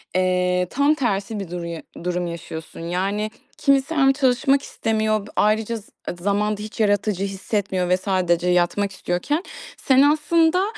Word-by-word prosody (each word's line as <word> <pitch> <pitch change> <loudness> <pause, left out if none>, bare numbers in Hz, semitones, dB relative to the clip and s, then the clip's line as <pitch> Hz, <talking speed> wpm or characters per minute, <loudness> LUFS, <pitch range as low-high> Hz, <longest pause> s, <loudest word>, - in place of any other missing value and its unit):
eee, 180 0 +2
tam 285 +3 +3
tersi 215 -6 -1
bir 195 - -6
duruyu 170 -2 -5 0.2
durum 180 0 -1
yaşıyorsun. 160 -1 -7
Yani, 195 +5 -2 0.3
kimisi 275 +2 +2
hem 270 -2 +5
çalışmak 270 +1 +2
istemiyor, 215 -2 -1
b - - -12
ayrıca 220 +2 +1
z 210 - -13 0.3
zamanda 205 +2 0
hiç 215 +2 -8
yaratıcı 205 -2 +1
hissetmiyor 195 -2 -2
ve 180 - +4
sadece 180 -2 0
yatmak 180 +3 +1
istiyorken, 190 - -2 0.3
sen 265 0 +4
aslında, 320 +4 +3
205 Hz, 140 wpm, -22 LUFS, 180-255 Hz, 0.3 s, hem